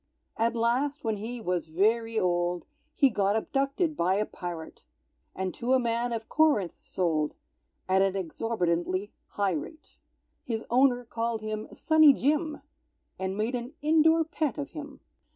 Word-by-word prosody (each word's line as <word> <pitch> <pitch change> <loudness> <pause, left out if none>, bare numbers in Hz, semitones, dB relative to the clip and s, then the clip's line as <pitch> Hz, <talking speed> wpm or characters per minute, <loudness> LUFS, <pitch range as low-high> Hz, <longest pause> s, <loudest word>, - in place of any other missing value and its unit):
_"] - - -51 0.4
At 230 +1 +1
last, 255 +6 0
when 220 -2 -1
he 235 +4 -5
was 180 -6 -2
very 225 +7 +1
old, 175 -1 0 0.3
He 275 -5 +4
got 200 -1 +1
abducted 275 +7 0
by 185 -2 +2
a 210 +1 +1
pirate, 175 -5 -7 0.5
And 190 -1 -2
to 250 +2 0
a 260 - +5
man 235 0 0
of 225 -1 -4
Corinth 295 - +2
sold, 160 -5 -1 0.5
At 190 +1 +3
an 195 0 +2
exorbitantly 185 0 -1 0.2
high 200 -1 0
rate; 240 - -7 0.5
His 225 -2 -3
owner 245 -1 +4
called 230 -1 -2
him 215 0 -4
"Sunny 315 -2 +6
Jim," 300 +4 0 0.6
And 190 +1 -2
made 220 +4 -1
an 245 +2 -4
indoor 320 +1 +5
pet 315 -2 -2
of 285 -1 -5
him. 295 -1 -9
225 Hz, 150 wpm, -28 LUFS, 190-275 Hz, 0.6 s, Sunny